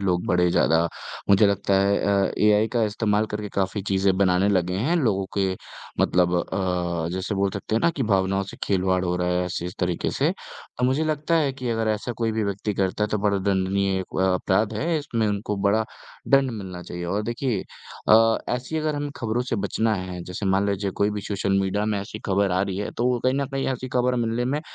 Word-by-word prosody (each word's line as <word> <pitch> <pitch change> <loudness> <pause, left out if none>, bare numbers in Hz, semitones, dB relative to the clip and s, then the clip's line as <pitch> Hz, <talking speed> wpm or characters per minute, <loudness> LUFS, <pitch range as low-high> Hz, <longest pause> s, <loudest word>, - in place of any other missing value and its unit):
लोग 90 -3 0
बड़े 90 0 +3
ज़्यादा 80 -1 +3 0.5
मुझे 100 +1 +6
लगता 100 0 +1
है 100 +1 +3
अ - - -2 0.2
अ, - - -5
एआई 105 +1 +4
का 120 -2 +2
इस्तेमाल 105 0 0
करके 105 0 -5
काफ़ी 95 +1 -1
चीज़ें 95 -1 +1
बनाने 95 0 +3
लगे 90 -2 +1
हैं 175 +3 +2
लोगों 105 - +1
के 95 -1 +2 0.5
मतलब 90 0 +3
अ, 90 -2 -1
जैसे 95 +3 -2
बोल 100 0 +1
सकते 100 +2 -4
हैं 115 - +2
ना 170 - +4
कि 140 -5 -3
भावनाओं 95 -2 +1
से - - -11
खिलवाड़ 95 -1 +1
हो 90 - 0
रहा 90 0 -1
है 90 0 +1
ऐसे 90 -1 -3
इस 90 - -6
तरीके 90 -2 0
से, - - +1 0.5
तो 125 - +1
मुझे 135 +5 +2
लगता 155 +2 0
है 145 -4 +2
कि 130 -2 -5
अगर 110 -1 0
ऐसा 110 +3 -1
कोई 115 -1 0
भी 110 -1 0
व्यक्ति 100 +1 -2
करता 95 +2 0
है, - - -2
तो 105 -1 -1
बड़ा 100 -1 +1
दंडनीय 95 0 +1
एक 95 - -6
अपराध 95 +4 +1
है, 160 +7 0
इसमें 115 -7 -1
उनको 105 0 -2
बड़ा 110 +2 +2 0.4
दंड 135 -1 +4
मिलना 95 -5 -7
चाहिए 90 0 -6
और 100 +4 -1
देखिए 120 -2 -1 0.5
अ, 115 +1 +6 0.2
ऐसी 125 +6 -4
अगर 155 -1 -1
हम 145 0 -3
खबरों 115 +1 -1
से 125 -2 -2
बचना 110 +3 0
है 90 -2 -5
जैसे 90 +2 -5
मान 95 +1 +2
लीजिए 100 0 -1
कोई 100 +1 +3
भी 105 0 -3
सोशल 100 -1 0
मीडिया 100 +2 0
में 105 -2 0
ऐसी 105 +2 -7
खबर 100 0 +2
आ 90 - +2
रही 95 -2 -3
है, 105 - -3
तो 125 +1 0
कहीं 130 +1 +3
न 140 - -1
कहीं 135 0 -1
ऐसी 130 0 -5
खबर 125 0 +1
मिलने 115 +2 -1
में 140 +4 -1
100 Hz, 225 wpm, -24 LUFS, 95-115 Hz, 0.5 s, मुझे